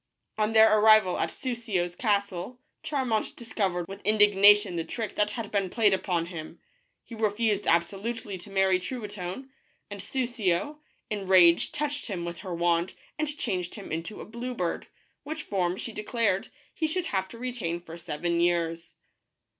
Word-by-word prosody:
On 215 +1 +1
their 220 -1 +7
arrival 215 -3 +6
at - - +1
Soussio's 220 -9 -2
castle, 200 0 -1 0.2
Charmant 255 -7 -1
discovered 195 -7 -2
with 195 +1 -9
indignation 205 -1 +5
the 165 - -1
trick 225 +5 -4
that 210 0 0
had 230 -4 -5
been 195 -2 0
played 210 -1 +3
upon 180 -3 0
him. 170 -3 -8 0.4
He - - -12
refused 215 -1 0
absolutely 200 +5 0
to 190 - -10
marry 190 -1 +3
Truitonne, 210 +2 -6 0.4
and 200 -1 -6
Soussio, 240 - -1 0.3
in 210 - -1
a 195 - -7
rage, 175 -3 +5
touched 295 -1 -3
him 180 -6 -4
with 170 0 -6
her 185 -3 -5
wand 170 +1 +1 0.2
and 305 -1 -2
changed 180 -7 -2
him 205 - -9
into 165 +6 -4
a - - -8
blue 240 +3 -6
bird, 175 -6 -2 0.3
which 310 +1 -6
form, 185 -2 -1
she 230 - -5
declared, 210 -2 0 0.3
he 320 - 0
should 350 +3 -2
have 190 - -1
to 230 - -11
retain 230 -9 -3
for 165 -1 -10
seven 170 +1 -2
years. 170 -1 0
200 Hz, 160 wpm, -28 LUFS, 175-230 Hz, 0.4 s, their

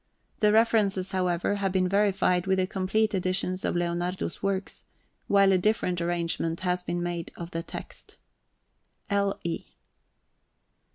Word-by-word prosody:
The 210 -2 +4
references, 210 -4 +2
however, 180 +1 0
have 195 -1 0
been 185 -1 +2
verified 195 -2 +2
with 190 0 +2
the 185 - +2
complete 200 +3 0
editions 185 0 -1
of - - 0
Leonardo's 175 +1 -2
works, 195 -1 -2 0.4
while 200 -1 +5
a 185 - +4
different 180 -3 +1
arrangement 170 -1 -1
has 180 -1 0
been 175 -1 -3
made 175 -1 -3
of 170 0 -7
the 165 - -2
text. - - -9 0.9
L. 200 0 +1
E. 170 -1 -3
185 Hz, 135 wpm, -27 LUFS, 175-200 Hz, 0.9 s, while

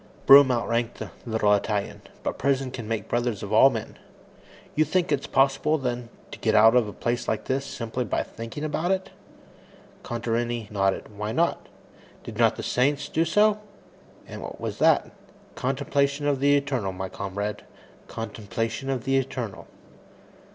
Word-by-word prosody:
Broom 140 0 +9
outranked 120 -1 -1
the - - -7 0.2
little 110 -2 +2
Italian, 105 0 -1 0.2
but - - -3
prison 135 -1 +1
can 120 -4 -6
make 110 -3 -3
brothers 120 -4 -1
of 100 +1 -4
all 125 +5 +8
men. 115 -5 -6 0.7
"You 155 - +3
think 175 +3 0
it's 140 -2 0
possible 140 +3 +2
then, 125 -3 -3 0.2
to - - -9
get - - +1
out 110 +2 +7
of 120 -3 +4
a - - -5
place 120 +3 -2
like - - -1
this, 135 +1 -1
simply 115 +2 -3
by 105 - -1
thinking 115 +6 -8
about 155 +3 -1
it?" 190 0 -1 0.9
Contarini 120 -1 -2
nodded. 100 +1 -1
"Why 105 +1 -3
not? 170 +8 0 0.5
Did - - -8
not - - +4
the - - -6
saints 145 +3 +1
do 160 - +1
so? 210 +5 +3 0.7
And - - -9
what - - -8
was - - -5
that? - - +3 0.4
Contemplation 140 +2 0
of 145 -2 +1
the 145 +1 +4
Eternal, 130 -9 -2
my 95 +1 -4
comrade; 100 +2 -4 0.5
contemplation 115 +3 -4
of 130 -3 -1
the 135 0 +2
Eternal." 125 -5 -4
120 Hz, 160 wpm, -25 LUFS, 110-140 Hz, 0.9 s, Broom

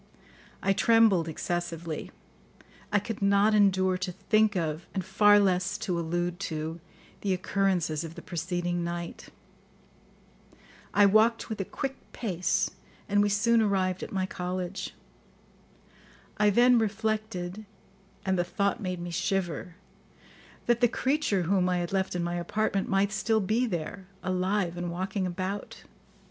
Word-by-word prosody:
I 195 - +3
trembled 210 -4 +4
excessively; 170 -1 -3 0.8
I 210 - +4
could 210 +1 -4
not 200 +2 +4
endure 190 -3 +3
to 180 0 -2
think 215 +3 +2
of, 160 -2 -2
and 190 -3 -2
far 205 +2 +5
less 190 +1 +1
to 180 -5 -2
allude 175 +2 -2
to, 160 +1 -4 0.4
the 195 -2 +1
occurrences 180 -4 0
of 165 0 -8
the - - -9
preceding 175 0 -2
night. 170 0 -5 1.6
I 205 - +5
walked 220 +3 +4
with 215 -2 -3
a - - -3
quick 270 +5 -4 0.2
pace, 185 -5 0 0.4
and 205 0 +3
we 205 - +3
soon 225 +3 +3
arrived 190 -3 +1
at - - -6
my 190 -1 0
college. 185 +1 -4 1.4
I 210 0 +4
then 240 +3 +5
reflected, 215 -2 -2 0.6
and 190 -1 +1
the - - +3
thought 200 +5 -1
made 185 -2 -3
me 175 0 -5
shiver, 185 -2 -2 0.9
that 240 0 +2
the 240 - +6
creature 260 -6 0
whom 185 +1 +2
I 180 - +1
had 175 +1 -3
left 190 -1 0
in 175 - -1
my 175 0 -2
apartment 195 +3 -1
might 195 +1 +2
still 220 +1 +1
be 220 +5 +1
there, 185 0 -4 0.2
alive 185 -1 0
and 175 0 -3
walking 185 +2 -2
about. 185 +3 -5
190 Hz, 140 wpm, -28 LUFS, 175-210 Hz, 1.6 s, the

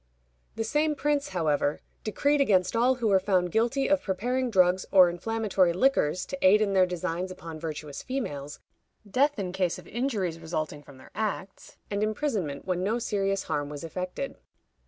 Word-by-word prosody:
The 225 - -1
same 300 +6 +1
prince, 290 0 0
however, 150 -4 0 0.2
decreed 285 +7 +1
against 190 -6 +3
all 245 +3 +4
who 235 -3 0
were 195 -1 +5
found 185 -2 +1
guilty 240 +6 +1
of 290 -1 +3
preparing 245 +6 -1
drugs 185 -3 +3
or 185 -3 +7
inflammatory 195 -1 +1
liquors 185 - +2
to 275 - -5
aid 195 +3 +7
in 205 -2 +1
their 185 -1 +5
designs 180 0 -3
upon 165 -3 -8
virtuous 155 -3 -6
females, 150 - -4 0.5
death 280 +8 +2
in 190 -3 -3
case 180 -2 0
of - - -12
injuries 210 -9 -2
resulting 155 -2 -4
from 140 -2 -15
their - - -16
acts, 205 -3 -4
and 200 0 -1
imprisonment 215 - -2
when 185 -1 -1
no 215 +5 +1
serious 195 -4 -1
harm 145 -1 -2
was 145 0 -7
effected. 180 +10 -5
190 Hz, 170 wpm, -27 LUFS, 175-235 Hz, 0.5 s, or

